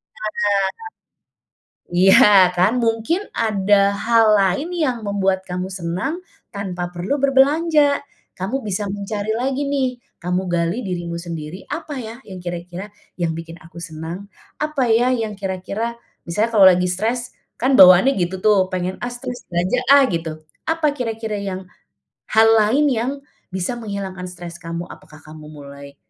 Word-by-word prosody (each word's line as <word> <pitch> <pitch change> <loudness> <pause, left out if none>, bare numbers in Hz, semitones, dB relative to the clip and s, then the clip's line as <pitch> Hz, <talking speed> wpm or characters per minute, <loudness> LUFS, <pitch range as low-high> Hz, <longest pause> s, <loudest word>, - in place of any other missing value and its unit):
Sadar, 215 0 -5 1.6
iya 190 +3 +7 0.3
kan, 185 +4 +3
mungkin 225 - 0
ada 200 -2 +2
hal 230 -1 +5 0.2
lain 195 - 0
yang 255 -5 0
membuat 195 -2 +1
kamu 180 +1 -3
senang 185 - -3 0.3
tanpa 185 -3 -4
perlu 180 +11 -2
berbelanja. 285 +2 +3 0.3
Kamu 230 +9 -3
bisa 205 0 -2
mencari 205 +1 -3
lagi 265 +3 -1
nih, 275 -2 +1 0.3
kamu 180 +1 0
gali 170 +5 0
dirimu 175 -2 -4
sendiri, 170 +1 -7
apa 315 -3 -5
ya 225 -1 -7
yang 190 -2 -9
kira-kira 175 +2 -6 0.3
yang 170 -2 0
bikin 165 0 -8
aku 165 +1 -15
senang? 170 +4 -7 0.3
Apa 300 -4 -1
ya 240 +3 +3
yang 225 -3 -2
kira-kira 200 +4 -4 0.3
misalnya 210 +7 0
kalau 200 -2 +8
lagi 180 -1 +5
stres, 230 +7 -2 0.2
kan 260 +2 +2
bawaannya 185 +8 +8
gitu 185 +1 -2
tuh, 205 -3 +4
pengen, 185 0 -2
"Ah, 245 - -2
stres 245 0 -7
belanja 180 +8 +1
ah," 280 -1 +7
gitu. 160 -2 -4 0.2
Apa 320 -1 +1
kira-kira 225 -4 -3
yang 190 -2 -5 0.6
hal 220 0 +5
lain 225 +7 +3
yang 245 +2 0 0.4
bisa 190 +6 -2
menghilangkan 200 -5 -6
stres 175 -1 -9
kamu? 170 +1 -5
Apakah 155 - -14
kamu 155 0 -12
mulai 140 -1 -11
200 Hz, 145 wpm, -20 LUFS, 175-235 Hz, 1.6 s, kalau